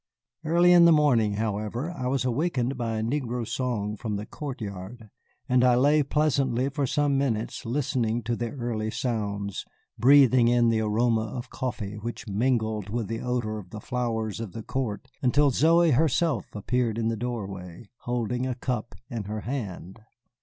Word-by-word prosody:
Early 170 +2 +4
in 175 -1 +8
the 170 - +7
morning, 130 -9 +4
however, 110 +7 -2
I 130 -8 -4
was 135 0 0
awakened 130 -1 0
by 115 -3 -2
a 110 - -1
negro 120 -2 -2
song 110 -5 -2
from 105 0 -4
the 105 +1 -4
court 140 +2 -6
yard, 105 +2 -8 0.4
and 125 0 +3
I 125 -1 +5
lay 145 +4 +4
pleasantly 135 -3 +1
for 140 -1 -1
some 145 0 +1
minutes 115 -4 -2
listening 120 -3 0
to 120 +2 -1
the 120 0 -3
early 115 -4 -3
sounds, 100 -4 -3 0.4
breathing 130 -2 +6
in 120 -1 +4
the 110 -1 +2
aroma 110 +1 +1
of 120 +3 -7
coffee 105 -5 -4
which 120 +3 -6
mingled 110 -1 0
with 110 -1 -3
the 115 0 -3
odor 120 -3 -2
of 95 -3 -12
the 105 - -7
flowers 115 -2 -2
of 115 -5 -6
the 115 - -6
court, 130 0 -3
until 140 +2 +3
Zoey 165 +5 +4
herself 150 - +1
appeared 115 +1 0
in 115 -1 0
the 115 - -1
doorway, 100 -5 -6
holding 125 +1 -2
a 125 - -2
cup 120 -2 -3
in 115 -4 -5
her 105 +1 -4
hand. 105 -6 -5
120 Hz, 170 wpm, -26 LUFS, 110-130 Hz, 0.4 s, in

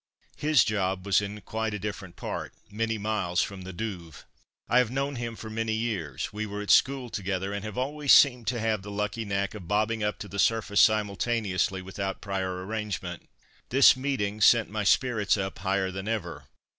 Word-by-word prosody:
His 150 0 +4
job 95 -3 -1
was 100 0 +3
in 105 +1 -6
quite 110 +2 -3
a - - -4
different 100 -3 -6
part, - - -5 0.2
many 115 +1 -1
miles 100 -4 0
from 100 -2 -6
the 95 +1 -7
Douve. 90 -6 -6 0.4
I 120 - +4
have 125 -3 +2
known 135 +2 -2
him 115 -1 -4
for 110 - -9
many 110 0 -2
years; 105 - -3
we 110 +1 -3
were 105 0 -5
at 105 - +1
school 130 -3 +3
together, 95 0 -2
and 100 -1 -4
have 105 -2 -6
always 140 +2 0
seemed 125 -5 +6
to 120 0 0
have 110 -2 0
the 105 - -9
lucky 105 +2 -3
knack 100 -1 -1
of 100 -6 -9
bobbing 110 +3 0
up 105 0 -1
to 105 - -7
the 100 +1 -6
surface 110 -2 +3
simultaneously 105 -3 +1
without 95 +1 -4
prior 95 -2 -3
arrangement. 105 -1 -5 0.4
This 135 +2 +7
meeting 120 -6 -2
sent 115 0 +5
my 105 0 -2
spirits 105 -2 +2
up 95 -2 -4
higher 95 0 0
than 95 +2 -6
ever. 85 -10 -3
105 Hz, 190 wpm, -27 LUFS, 95-115 Hz, 0.4 s, This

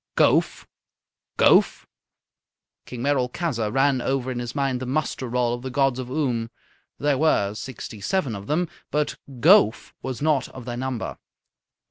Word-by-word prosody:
"Gowf? - - +3 0.7
Gowf?" - - +4 1.0
King 125 -1 -6
Merolchazzar 130 -3 0
ran 135 +1 +2
over 130 0 -1
in 125 - -3
his 120 +1 -5
mind 135 -3 0
the 130 - -5
muster 130 -2 -2
roll 120 0 +1
of 120 - -4
the 130 - -5
gods 135 0 +1
of 125 -1 -5
Oom. 125 -5 -1 0.5
There 145 -1 +1
were 105 -10 +2
sixty 110 -1 -8
seven 145 - -1
of 100 0 -8
them, 170 +4 +1 0.2
but 150 0 -1 0.2
Gowf 180 - +5
was 130 -3 -4
not 145 -3 +1
of 130 -3 -10
their 120 -1 -4
number. 130 -2 -4
130 Hz, 150 wpm, -24 LUFS, 120-145 Hz, 1.0 s, Gowf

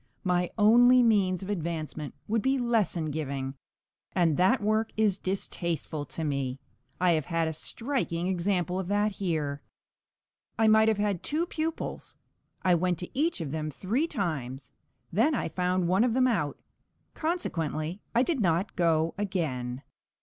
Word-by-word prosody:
My 180 -1 +1
only 245 +4 +6
means 195 -5 +2
of 190 - -7
advancement 160 -4 -4
would 225 +1 +1
be 265 +3 +2
lesson 215 - +1
giving, 140 -3 -3 0.6
and 170 -5 +3
that 190 - +4
work 215 +1 +1
is 205 -3 +2
distasteful 170 -5 -3
to 160 - -5
me. 140 -3 -2 0.4
I 180 -1 +4
have 155 -4 +1
had 165 -2 0
a 160 - -2
striking 225 - -2
example 180 0 0
of 190 - -3
that 205 +2 +1
here. 155 -7 -2 1.0
I 225 - +4
might 220 0 +6
have 220 -2 +3
had 205 -4 0
two 315 +3 -1
pupils. 325 -1 -4 0.5
I 185 -1 +4
went 175 0 +1
to 180 - -7
each 305 - +1
of 150 -4 -4
them 155 0 -2
three 220 - -1
times, 135 - -3 0.4
then 240 - +3
I 230 - -1
found 180 0 0
one 190 +5 +3
of 245 -2 +1
them 255 0 +4
out; 175 - 0 0.6
consequently 175 - -2
I 240 - +5
did 320 -2 0
not 180 -1 +1
go 165 -2 +2
again. 140 -11 -2
180 Hz, 155 wpm, -28 LUFS, 160-220 Hz, 1.0 s, only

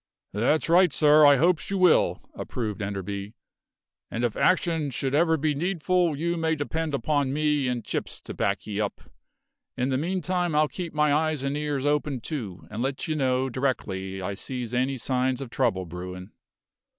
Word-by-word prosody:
"That's 120 +10 +1
right, 175 0 +5
sir; 150 +1 +6
I 145 - +7
hopes 165 +4 +2
you 195 - -1
will," 180 -3 +4
approved 110 -3 -4
Enderby. 100 +1 -4 0.7
"And 120 - -3
if 120 -3 0
action 165 -5 +2
should 135 +1 -2
ever 160 +2 +3
be 150 0 +1
needful 175 0 0
you 170 +3 -1
may 160 -1 +1
depend 155 +1 -2
upon 140 +1 0
me 150 -1 +1
and 125 -2 -2
Chips - - -4
to - - -8
back - - -1
ye 105 0 -2
up. 105 - -3 0.8
In 125 +2 0
the 130 -1 +1
meantime 180 0 -1
I'll 150 0 +4
keep 170 0 -6
my 150 -1 +3
eyes 155 -2 +1
and 140 +1 -1
ears 145 -2 -2
open, 145 -2 0
too, 115 - -6
and 110 +2 -4
let 135 +2 -2
you 155 - -1
know 130 -2 +1
directly 95 -8 -2
I 100 +2 -2
sees 125 +3 -5
any 130 +2 0
signs 130 +1 0
of 135 -4 -7
trouble 115 -9 0
brewin'." 90 +2 -8
140 Hz, 175 wpm, -26 LUFS, 120-155 Hz, 0.8 s, I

